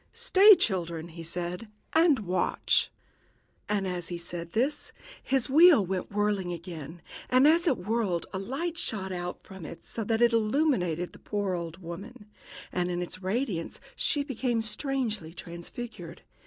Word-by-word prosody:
"Stay, 425 -3 +7
children," 170 - -1
he 165 0 -9
said, 175 +5 -4 0.3
"and 320 -6 +5
watch." 180 +1 +1 0.8
And, 200 -2 0
as 180 -2 -3
he 175 - -4
said 170 -1 -7
this, 265 +7 0 0.3
his 265 -2 0
wheel 305 - +7
went 185 +1 -3
whirling 205 -3 0
again; 170 -2 -8 0.3
and 255 +3 +6
as 335 +3 +4
it 275 - +3
whirled 205 -4 -1
a 190 - -2
light 315 - -3
shot 190 - -2
out 180 -1 -5
from 190 -3 -11
it, 165 +2 -9
so 225 - -4
that 225 +2 +2
it 235 0 +5
illuminated 215 - +1
the - - -14
poor 205 -2 -2
old 170 +1 -5
woman, 205 +8 -8 0.5
and 180 0 -1
in 175 0 -2
its 185 +2 -7
radiance 195 -3 -2 0.2
she 290 - +1
became 245 -4 -1
strangely 215 - -3
transfigured. 170 +9 -8
200 Hz, 155 wpm, -28 LUFS, 175-255 Hz, 0.8 s, Stay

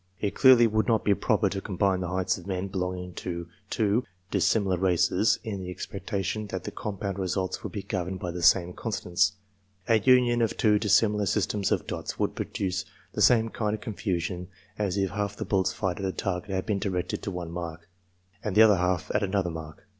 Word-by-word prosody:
It 100 - -1
clearly 130 -3 +7
would 110 -1 +1
not 115 -3 +2
be 100 - +5
proper - - +1
to 100 - -3
combine 95 -1 0
the 90 - -3
heights 95 +1 0
of 90 - -11
men 95 0 -2
belonging 90 -1 -3
to 85 -1 -4 0.2
two 110 +2 +1 0.3
dissimilar 100 -4 +2
races, 90 +2 +3
in 100 -3 -4
the 90 - -6
expectation 100 +3 -4
that 95 -2 -5
the 105 - -5
compound 100 -2 -4
results 95 0 -2
would - - -6
be 100 -3 -5
governed 95 -1 -3
by 90 - -3
the 90 0 -5
same 90 +1 +4
constants. 100 -2 0 0.5
A 115 -1 +4
union 120 0 +4
of 115 - 0
two 105 -2 +4
dis 105 -3 +4
similar 105 -2 +2
systems 100 0 0
of - - +1
dots - - -5
would - - 0
produce 95 -1 -2 0.3
the - - -2
same 115 -2 +5
kind 110 -3 -1
of - - -10
confusion 90 -4 -3 0.3
as 100 -2 -1
if 95 -1 0
half 105 0 -2
the - - -5
bullets 95 -2 +1
fired 95 -2 -2
at 95 - -2
a 95 - 0
target 95 0 -3
had 95 -1 -2
been 105 -3 0
directed 95 -3 -2
to - - -4
one 90 -3 -5
mark, 85 -1 -6 0.6
and 105 -3 -2
the 110 - +8
other 105 -3 +6
half 90 0 0
to 105 - +1
another 95 -2 0
mark. 80 -1 -9
95 Hz, 205 wpm, -27 LUFS, 90-105 Hz, 0.6 s, the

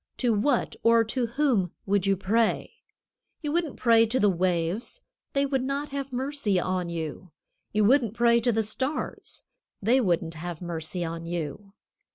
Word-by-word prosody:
To 245 -3 +2
what 235 +5 +1
or 230 0 +5
to 235 +2 -1
whom 235 - +1
would 195 -1 +1
you 195 -1 +3
pray? 215 +4 +1 0.7
You 295 - -1
wouldn't 330 -3 -1
pray 230 -1 +5
to 255 +4 0
the 205 -1 +4
waves. 180 - -1 0.3
They 275 0 +2
would 270 -2 0
not 280 +2 -2
have 275 -1 -4
mercy 260 -6 0
on 180 -1 -1
you. 165 +2 -5 0.4
You 210 0 +2
wouldn't 235 -2 +3
pray 235 0 +4
to 240 +1 +2
the 225 0 +1
stars. 260 +8 -4 0.4
They 240 +6 +3
wouldn't 170 -5 0
have 165 0 -6
mercy 175 0 -3
on 165 0 -5
you. 175 +4 -5
215 Hz, 165 wpm, -27 LUFS, 180-255 Hz, 0.7 s, or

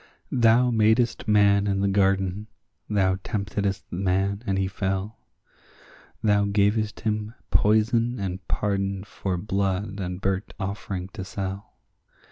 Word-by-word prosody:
Thou 120 0 +4
madest 110 +1 +2
man 100 -1 +4
in 95 -1 0
the 100 - +2
garden; 95 0 +1 0.4
thou 95 -3 +2
temptedst 100 -3 -2
man, 95 +2 0
and 95 - +1
he 95 -1 +1
fell; 95 +2 -3 1.0
Thou 105 -2 +3
gavest 105 +1 +1
him 110 +1 -2 0.2
poison 115 +3 +3
and 95 -1 -3
pardon 100 -2 -1
for 95 -2 -3
blood 100 +1 -1
and 90 -1 -4
burnt 95 +1 -2
offering 95 -2 -4
to 95 0 -7
sell. 95 +1 -6
100 Hz, 120 wpm, -25 LUFS, 95-105 Hz, 1.0 s, Thou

